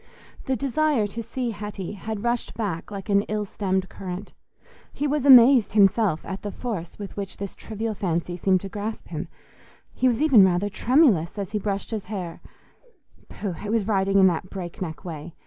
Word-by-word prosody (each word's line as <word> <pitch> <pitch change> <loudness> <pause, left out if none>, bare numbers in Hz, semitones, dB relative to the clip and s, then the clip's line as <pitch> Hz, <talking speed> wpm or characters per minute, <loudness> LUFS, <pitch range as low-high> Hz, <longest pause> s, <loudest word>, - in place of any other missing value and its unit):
The 265 - 0
desire 275 -1 +1
to 215 +3 -5
see 235 +2 -3
Hetty 205 -3 -6
had 210 +1 -5
rushed 240 0 -1
back 195 -8 -3
like 200 -2 -7
an 200 0 +4
ill 210 0 -1
stemmed 190 -2 -1
current; 185 +1 -7 0.6
he 290 - -3
was 290 -1 0
amazed 250 -3 +8
himself 200 -4 +3
at 190 0 -5
the 205 - -4
force 195 -7 -5
with 200 -2 -8
which 200 -1 -5
this 200 -1 -6
trivial 220 0 -4
fancy 175 -3 -2
seemed 185 +1 +2
to 195 - -6
grasp 210 +3 -5
him: - - -4 0.7
he 255 - +1
was 240 -2 +2
even 275 -9 +6
rather 190 +2 +2
tremulous 220 - +3
as 200 -1 -4
he 210 - -1
brushed 200 +1 -3
his 215 -3 -3
hair—pooh! 200 - -9
it 210 - -4
was 220 -2 +1
riding 195 -2 +2
in 190 - +7
that 180 0 +1
break 180 -3 -7
neck 160 -3 -5
way. 165 0 -7
205 Hz, 180 wpm, -24 LUFS, 190-230 Hz, 0.7 s, amazed